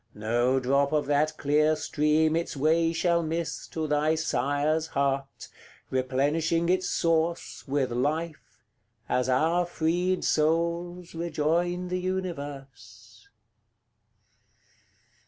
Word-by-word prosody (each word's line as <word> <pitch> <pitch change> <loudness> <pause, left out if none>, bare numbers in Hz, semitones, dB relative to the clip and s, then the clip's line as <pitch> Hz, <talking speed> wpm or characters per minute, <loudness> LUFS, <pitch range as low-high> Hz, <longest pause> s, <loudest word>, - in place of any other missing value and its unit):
No 120 +5 +1
drop 140 +3 +1
of 150 -1 +1
that 145 +2 +1
clear 150 +2 +2
stream 155 +1 +1
its 165 -3 -2
way 165 +3 +2
shall 170 0 +1
miss 165 +1 -3
To 160 -1 -4
thy 150 +1 +1
sire's 155 +1 0
heart, 140 -1 -2 0.4
replenishing 145 +6 0
its 185 0 +1
source 165 0 0
With 135 -2 0
life, 155 +6 -3 0.4
as 125 0 0
our 160 +7 +2
freed 175 +2 -1
souls 170 +3 0
rejoin 170 +2 -1
the 180 0 -1
universe. 170 - -6
155 Hz, 100 wpm, -27 LUFS, 140-170 Hz, 0.4 s, clear